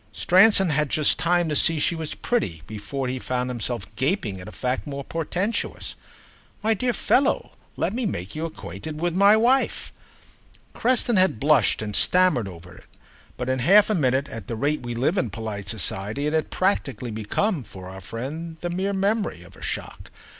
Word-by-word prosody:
Stransom 190 - +5
had 150 -1 +1
just 155 +2 +2
time 175 +1 +2
to 150 - -1
see 165 +2 +6
she 160 - +1
was 160 -2 -3
pretty 85 - -2
before 110 +6 -5
he 130 +1 -3
found 125 0 -2
himself 120 -3 -3
gaping 115 - -1
at 90 - -10
a - - -8
fact 125 +2 -3
more 140 -1 -5
portentous. 180 - -3 0.7
"My 225 +1 +3
dear 245 +4 0
fellow, 270 +4 +1 0.3
let - - -1
me 240 -1 -1
make 95 - -5
you 155 +2 -2
acquainted 150 - -7
with 175 +1 0
my 200 +4 +6
wife." 250 +4 +1 0.8
Creston 240 -2 +1
had 185 -11 +3
blushed 140 -7 +3
and 105 -1 -3
stammered 180 - +3
over 90 -1 -11
it, - - -17 0.5
but 125 - -4
in 130 0 0
half 200 - +5
a - - +3
minute, 135 -5 +1
at 115 -4 -8
the 115 - -3
rate 145 +6 0
we 120 -1 -5
live 150 - +1
in - - -1
polite 105 -3 -5
society, 105 +5 -1
it 150 - -1
had 160 -1 0
practically 140 - -1
become, 135 - -1
for 95 -5 -11
our 95 +1 -9
friend, 155 - -6
the 175 - -3
mere 190 +3 -1
memory 200 - -1
of 90 - -16
a - - -16
shock. - - -6
150 Hz, 185 wpm, -24 LUFS, 115-185 Hz, 0.8 s, see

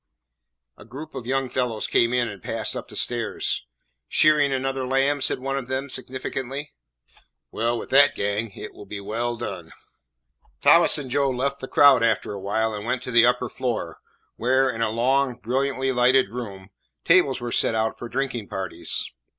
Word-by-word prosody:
A - - -11
group 140 +8 -10
of 120 - -7
young 135 0 0
fellows 125 -3 -2
came 115 0 +2
in 125 -1 +1
and 100 -4 -8
passed - - -3
up - - -6
the - - -10
stairs. 115 - -2 0.4
"Shearing 150 -2 +4
another 135 0 -2
lamb?" 135 +2 +1
said - - 0
one 135 +1 -2
of 125 - -8
them 130 +1 -3
significantly. 135 +2 -4 0.8
"Well, 120 +2 0
with - - -8
that 140 +2 +6
gang 105 +3 -1
it - - -8
will 100 - -12
be 100 0 -6
well 115 +4 -3
done." - - -6 0.9
Thomas - - +6
and 135 -4 -6
Joe 140 +1 +2
left 135 +2 -2
the 130 - -6
crowd 140 -3 +6
after 110 -3 +1
a 100 - -7
while, 110 +3 0
and 105 -1 -5
went 125 +2 -2
to - - -5
the 120 0 +6
upper 125 0 +1
floor, 115 -10 -4 0.4
where, 130 +2 +2
in 115 -1 -5
a 115 - +2
long, 125 +3 +1
brilliantly 135 +4 -1
lighted 125 -2 +3
room, 100 -6 -7 0.3
tables 165 -7 +4
were 120 -1 -5
set 115 - +1
out 110 0 -1
for 120 - -7
drinking 125 -6 -3
parties. 95 -2 -4
125 Hz, 180 wpm, -24 LUFS, 115-135 Hz, 0.9 s, that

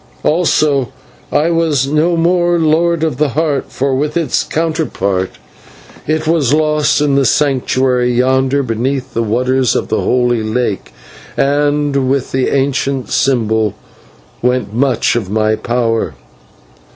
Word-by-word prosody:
Also, 150 -5 +1 0.4
I 155 +4 +2
was 160 -5 +1
no 155 +4 +1
more 175 +1 +2
Lord 165 +1 +1
of 155 -6 -1
the 150 0 +1
Heart, 150 -4 -1
for 135 +1 -1
with 150 +4 -1
its 160 -7 0
counterpart 150 - -1 0.8
it 155 0 0
was 155 -4 +2
lost 150 -1 +1
in 145 -2 +1
the 140 0 +3
Sanctuary 130 -2 +1
yonder 130 +3 +1
beneath 130 +2 -2
the 115 - 0
waters 125 +2 +1
of - - -2
the - - 0
Holy 120 -2 +1
Lake, 110 -2 -2 0.5
and 145 -1 +1
with 135 -1 -1
the 130 -1 0
ancient 135 -1 -1
symbol 110 -5 +1 0.7
went 125 -3 0
much 125 0 +1
of 110 -6 -2
my 110 +1 +1
power. 115 -1 -1
135 Hz, 130 wpm, -14 LUFS, 125-150 Hz, 0.8 s, the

